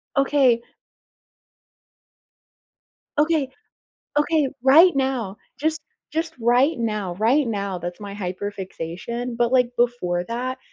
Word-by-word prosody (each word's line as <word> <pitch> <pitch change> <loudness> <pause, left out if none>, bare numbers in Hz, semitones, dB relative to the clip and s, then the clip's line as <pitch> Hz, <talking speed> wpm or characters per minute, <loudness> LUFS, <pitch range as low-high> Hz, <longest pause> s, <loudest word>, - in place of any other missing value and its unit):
Okay 275 -4 +3 2.6
Okay. 305 -3 +2 0.7
Okay. 295 -1 +2
Right 315 +7 +7
now, 260 -7 -1 0.2
just 315 +2 0 0.3
just 325 +1 -2
right 245 +5 +3
now, 210 -6 -2
right 240 +9 +2
now, 200 -4 -2
that's 175 +1 -6
my 205 -1 -7
hyper-fixation, 200 +4 -5
but, 235 0 +1
like, 250 -2 +3
before 210 -8 +1
that 250 +5 -3
240 Hz, 100 wpm, -23 LUFS, 200-275 Hz, 2.6 s, Right